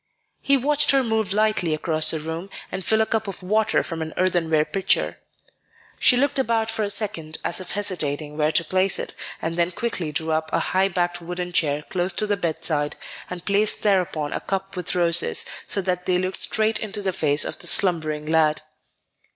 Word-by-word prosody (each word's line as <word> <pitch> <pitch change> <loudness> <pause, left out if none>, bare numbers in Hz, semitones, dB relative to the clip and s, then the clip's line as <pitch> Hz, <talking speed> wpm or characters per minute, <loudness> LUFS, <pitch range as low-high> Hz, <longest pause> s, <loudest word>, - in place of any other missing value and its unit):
He 275 0 +3
watched 290 +3 +2
her 270 -1 +5
move 220 -4 0
lightly 210 -6 +1
across 155 0 +3
the 160 - +1
room, 160 +5 -5 0.2
and 190 - -4
fill 220 +4 +2
a - - +3
cup 220 -1 -1
with 195 -2 -6
water 215 +3 +2
from 165 -2 -5
an 160 0 -5
earthenware 165 -4 +2
pitcher. 195 +3 0 0.8
She 250 - +4
looked 280 +1 +1
about 225 -3 +1
for 225 - -3
a 205 - 0
second 195 -7 -1
as 170 - 0
if 185 - -7
hesitating 155 -7 -2
where 155 0 +1
to - - +4
place 185 +3 +1
it, - - -5 0.3
and 165 +1 -2
then 170 0 +2
quickly 180 -6 -2
drew 160 +1 -2
up 160 0 -1
a - - +2
high 190 +1 +1
backed 175 -1 -2
wooden 175 +1 -5
chair 150 -3 +1
close 180 0 -1
to 215 - 0
the 205 -1 +1
bedside, 155 -4 -2 0.3
and 180 -1 -7
placed 205 +1 +1
thereon 180 -7 +1
a - - -2
cup 195 0 -4
with 180 0 +1
roses, 170 -1 +3 0.2
so 200 - 0
that 180 -1 -2
they 180 -1 +3
looked 185 +1 -2
straight 220 0 +2
into 205 -1 -4
the 190 -1 -1
face 145 -3 +2
of - - -5
the - - -2
slumbering 155 -5 +2
lad. 155 -1 +2
180 Hz, 200 wpm, -23 LUFS, 160-205 Hz, 0.8 s, her